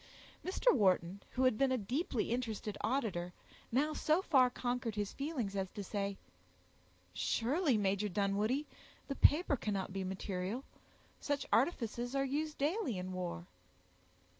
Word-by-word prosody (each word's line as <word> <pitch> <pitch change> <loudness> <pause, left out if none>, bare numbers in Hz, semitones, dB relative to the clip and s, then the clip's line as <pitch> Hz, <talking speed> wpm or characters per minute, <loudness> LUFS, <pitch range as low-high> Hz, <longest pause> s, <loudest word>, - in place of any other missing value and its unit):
Mr. 390 +7 +3
Wharton, 190 -2 +2
who 260 - +1
had 255 -4 +3
been 270 -1 +3
a 260 - +2
deeply 245 - -1
interested 225 -4 -2
auditor, 210 -8 -1 0.4
now 290 +6 +2
so 310 +2 +2
far 260 -7 +5
conquered 245 -2 -2
his 205 -1 -2
feelings 275 -9 -3
as 190 -1 -1
to 205 - -4
say, 200 0 -2 1.0
"Surely, 270 +2 +1
Major 200 0 +1
Dunwoodie, 205 - +1 0.4
the 275 - -1
paper 300 +1 +4
cannot 200 -6 -2
be 195 -1 -2
material; 190 +5 -3 0.6
such 285 -2 -1
artifices 245 -2 +1
are 275 0 +2
used 300 +3 -2
daily 295 - 0
in 185 +1 -4
war." 175 - -4
230 Hz, 140 wpm, -35 LUFS, 195-275 Hz, 1.0 s, far